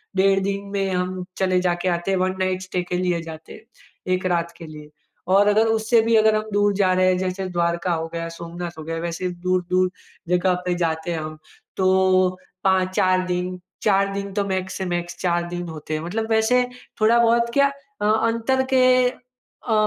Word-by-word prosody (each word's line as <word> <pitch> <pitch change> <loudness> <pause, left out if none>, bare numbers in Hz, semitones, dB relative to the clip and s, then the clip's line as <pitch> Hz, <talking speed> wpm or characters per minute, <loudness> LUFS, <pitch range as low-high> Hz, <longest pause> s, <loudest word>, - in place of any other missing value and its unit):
डेढ़ 195 +1 +4
दिन 200 0 -2
में 195 -1 0
हम 180 0 -2
चले 185 -1 +2
जा 180 -1 +2
के 185 - -1
आते 175 +3 -3
हैं। 190 - +2
1 185 0 +1
नाइट 185 0 0
स्टे 185 -1 -3
के 180 0 -3
लिए 180 -2 0
जाते 160 -1 -10
हैं, - - -12 0.5
1 185 0 -1
रात 170 0 -1
के 165 - -9
लिए। 150 -1 -11 0.5
और 200 +1 +5
अगर 215 +2 +4
उससे 225 +1 +3
भी 225 0 +2
अगर 220 0 +5
हम 215 0 -2
दूर 205 0 +3
जा 185 - +3
रहे 185 0 +3
हैं, 185 0 +3
जैसे 185 +1 -2
द्वारका 170 0 0
हो 165 0 -2
गया, 165 0 -3
सोमनाथ 170 0 -7
हो - - -6
गया, 165 +1 -4
वैसे 170 +2 -3 0.2
दूर-दूर 185 0 +1 0.4
जगह 180 +1 +2
पे 180 - 0
जाते 160 +1 -1
हैं 165 - -2
हम, 155 0 -6 0.4
तो 185 -1 +3 0.3
5-4 185 -1 +2
दिन, 180 0 -2 0.2
4 195 -1 +2
दिन 200 0 -4
तो 200 0 0
मैक्स 190 -1 -3
से 190 - -3
मैक्स 175 0 -6
4 175 -1 0
दिन 175 0 -5
होते 155 -1 -7
हैं। 155 - -1
मतलब 220 +5 -3
वैसे 245 +3 +3 0.3
थोड़ा 230 +2 +5
बहुत 235 0 +3
क्या 280 +1 +5 0.3
अ, - - +1
अंतर 230 +4 +2
के 260 -1 +5 0.8
अ, 225 - +1
185 Hz, 200 wpm, -22 LUFS, 175-200 Hz, 0.8 s, और